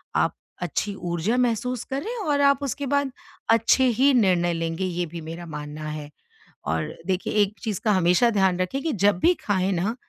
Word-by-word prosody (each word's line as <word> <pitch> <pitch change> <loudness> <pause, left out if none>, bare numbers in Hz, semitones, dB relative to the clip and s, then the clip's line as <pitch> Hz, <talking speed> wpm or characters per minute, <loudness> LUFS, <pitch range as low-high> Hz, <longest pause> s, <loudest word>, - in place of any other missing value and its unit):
आप - - +2 0.3
अच्छी 185 +4 -2
ऊर्जा 175 +7 -1
महसूस 250 0 0
करें 405 - -3
और 295 -7 +1
आप 280 0 +4
उसके 280 +1 -3
बाद 280 -1 +1 0.4
अच्छे 230 +3 +4 0.2
ही 280 +1 +5
निर्णय 180 -7 +3
लेंगे 165 +2 -2
ये 175 -1 -2
भी 170 0 -8
मेरा 165 +2 -7
मानना 150 -1 -7
है। 150 -1 -6 0.6
और 80 +2 -2
देखिए 185 0 -1
एक 200 - -3
चीज़ 210 -5 -2
का 215 - +4
हमेशा 180 +5 +4
ध्यान 190 -3 +2
रखें 265 +10 -1
कि 325 - -1
जब 200 -1 +3
भी 355 - +4
खाएँ 195 -1 +1
ना, 195 +7 -1
190 Hz, 185 wpm, -24 LUFS, 170-250 Hz, 0.6 s, ही